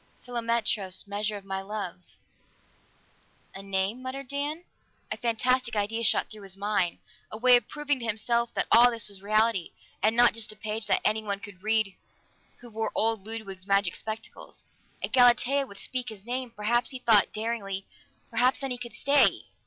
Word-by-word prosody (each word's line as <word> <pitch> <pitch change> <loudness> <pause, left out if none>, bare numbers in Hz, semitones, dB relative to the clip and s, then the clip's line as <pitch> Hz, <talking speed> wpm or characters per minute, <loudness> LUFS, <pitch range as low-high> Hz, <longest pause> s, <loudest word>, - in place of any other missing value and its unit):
Philometros! 230 -5 -1
Measure 210 +1 -2
of 195 - -12
my 195 0 -3
love!" 195 -3 -5 1.5
"A 195 - -7
name?" 195 +4 -1
muttered 260 +1 -6
Dan. 290 +4 -3 0.5
A - - 0
fantastic 245 +1 +1
idea 215 +3 -1
shot - - +2
through 215 -1 -11
his 195 -1 -6
mind 200 -3 0 0.3
a 215 - -4
way 250 +2 +6
of 245 - +2
proving 290 -2 -1
to 235 - -5
himself 235 +2 0
that - - +1
all 240 +1 +8
this 230 -3 -2
was 195 -1 -7
reality, 215 -2 +1 0.3
and 220 +1 +3
not 240 0 +6
just 225 -1 -4
a - - -10
page 215 0 -3
that - - +2
any 215 +1 +2
one 200 -2 -3
could 200 -2 -11
read 215 -2 +1 0.7
who 240 -1 -13
wore 220 0 -2
old 220 -2 +1
Ludwig's 200 -4 -3
magic 195 -3 +3
spectacles. 220 +1 -7 0.4
If - - -3
Galatea 255 +2 +4
would 200 - -11
speak 250 +3 -3
his 210 -2 -10
name! 250 +1 -3
Perhaps, 230 +2 0
he 260 - -5
thought 225 -5 +4
daringly, 215 -3 -3 0.5
perhaps 255 +2 +3
then 270 -2 -4
he 245 - -3
could 240 -1 -7
stay! 285 +1 +3
220 Hz, 175 wpm, -27 LUFS, 200-245 Hz, 1.5 s, all